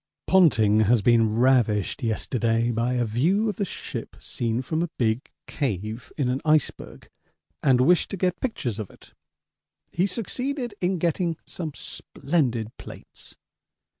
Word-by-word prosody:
Ponting 110 - +4
has 115 0 +3
been 115 -2 +4
ravished 120 -5 +2
yesterday 115 0 0
by 120 +2 0
a 120 -1 +1
view 165 - +1
of 210 - -2
the 200 - 0
ship - - -6
seen 115 +1 -2
from 160 +4 -1
a 175 - -1
big 115 +1 0 0.2
cave 110 - -4
in 140 -4 0
an 125 +2 -1
iceberg, 155 -1 0 0.5
and 130 -3 +4
wished 175 +6 +4
to 195 - -4
get 180 0 -1
pictures 125 - -2
of 105 - -5
it. - - -19 0.8
He 180 +3 +1
succeeded 245 +4 -3
in 185 +1 +1
getting 170 0 0
some 160 -4 -5
splendid 125 -8 -2
plates. - - -13
130 Hz, 140 wpm, -25 LUFS, 115-175 Hz, 0.8 s, Ponting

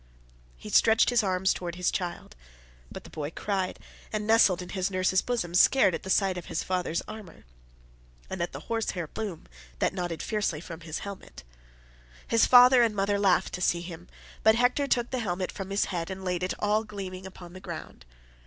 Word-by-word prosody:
He - - -10
stretched 225 +2 +5
his 245 -1 +4
arms 190 -2 +1
towards 175 -1 -6
his 180 - +1
child, 175 - -5 0.6
but - - -8
the - - -14
boy 150 -1 -4
cried 190 +2 -2 0.3
and 215 -1 -2
nestled 215 -5 +5
in 180 - -11
his 190 0 -1
nurse's 185 0 +2
bosom, 230 -9 -2
scared 190 +2 +5
at - - -3
the 190 - -8
sight 190 -1 +2
of 175 - -11
his - - -2
father's 180 -3 -1
armour, 215 - -10 0.8
and - - -5
at 170 - -2
the - - -8
horse 225 -1 -2
hair 175 -3 -3
plume 200 +1 -6 0.3
that - - 0
nodded 175 -3 -4
fiercely 210 -8 -1
from 170 0 -9
his 160 -1 -5
helmet. 200 - -9 0.8
His 230 - +4
father 250 0 +8
and 225 -3 +2
mother 200 0 +1
laughed 195 -3 +2
to 180 - -4
see 175 -1 +1
him, 175 0 -9 0.3
but 220 0 +5
Hector 245 +4 +2
took 240 -3 0
the 255 - -1
helmet 185 -4 -2
from 195 -1 -7
his 200 +1 +1
head 170 0 -3
and 190 0 -6
laid 180 -1 -1
it 185 - -1
all 210 +1 +1
gleaming 190 -3 -7
upon 175 -2 -12
the 185 - -9
ground. - - -8
190 Hz, 200 wpm, -28 LUFS, 175-215 Hz, 0.8 s, father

